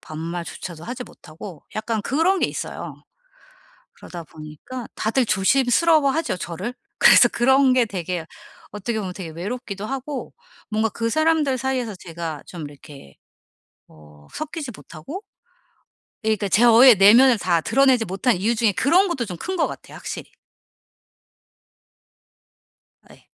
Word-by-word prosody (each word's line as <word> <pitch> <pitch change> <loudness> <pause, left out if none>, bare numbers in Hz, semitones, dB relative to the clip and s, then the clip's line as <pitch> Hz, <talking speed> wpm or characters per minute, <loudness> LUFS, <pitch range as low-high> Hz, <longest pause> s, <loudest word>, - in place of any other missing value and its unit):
반말조차도 165 +1 -7
하지 250 +1 -6
못하고 165 -2 -12
약간 220 0 -2
그런 330 - +1
게 - - +3
있어요. - - -6 1.0
그러다 170 -2 -10
보니까 155 +11 -9
다들 235 +3 0
조심스러워하죠, 275 - +2
저를. 185 +9 -5 0.2
그래서 - - +7
그런 265 +2 +3
게 255 -1 +4
되게 180 -5 -4 0.5
어떻게 215 +3 -4
보면 190 -4 -4
되게 180 -3 -7
외롭기도 200 +4 -6
하고 270 +1 -5 0.4
뭔가 220 +1 +1
그 230 +2 -3
사람들 315 -2 +2
사이에서 255 -4 -2
제가 165 -4 -7
좀 170 -3 -9
이렇게 140 - -15 0.7
어 75 -1 -18
섞이지 310 -3 -5
못하고 165 - -9 1.0
그니까 215 -2 0
제 215 +5 +3
어 235 0 +7
예 250 - +10
내면을 230 +6 +6
다 175 -4 +1
드러내지 260 +4 +3
못한 195 +6 0
이유 210 +6 0
중에 220 -2 +2
그런 350 - +3
것도 270 -9 -2
좀 180 -3 -6
큰 375 - -4
것 330 - +2
같아요, - - -10
확실히. - - -7 2.8
예. - - -19
220 Hz, 290 characters per minute, -22 LUFS, 175-265 Hz, 2.8 s, 예